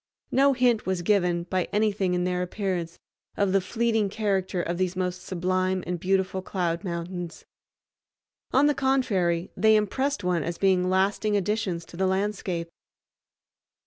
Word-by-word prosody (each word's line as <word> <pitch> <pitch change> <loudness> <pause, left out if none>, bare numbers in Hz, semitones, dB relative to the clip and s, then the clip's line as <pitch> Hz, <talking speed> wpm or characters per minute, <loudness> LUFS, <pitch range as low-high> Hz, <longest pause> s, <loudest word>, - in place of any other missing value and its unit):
No 275 +1 +4
hint 245 -5 +2
was 185 -2 -1
given, 175 -3 +2
by 180 0 -1
anything 205 -3 +1
in 180 - 0
their 180 0 0
appearance, 180 -3 -3 0.4
of 200 -2 +2
the 195 0 +3
fleeting 225 +1 0
character 195 -3 -1
of 175 0 -2
these 185 -1 0
most 180 -1 -2
sublime 185 +1 -1
and 175 -1 -3
beautiful 190 +1 0
cloud 175 -2 -2
mountains. 175 -1 -5 1.1
On 275 +2 +4
the 295 - +4
contrary 195 -11 +1
they 220 0 +5
impressed 260 +5 0
one 180 -2 +1
as 170 +2 -4
being 185 -2 +2
lasting 200 +3 +1
additions 195 -4 -1
to 170 - -12
the 190 0 +1
landscape. 190 -3 -1
190 Hz, 145 wpm, -26 LUFS, 180-210 Hz, 1.1 s, they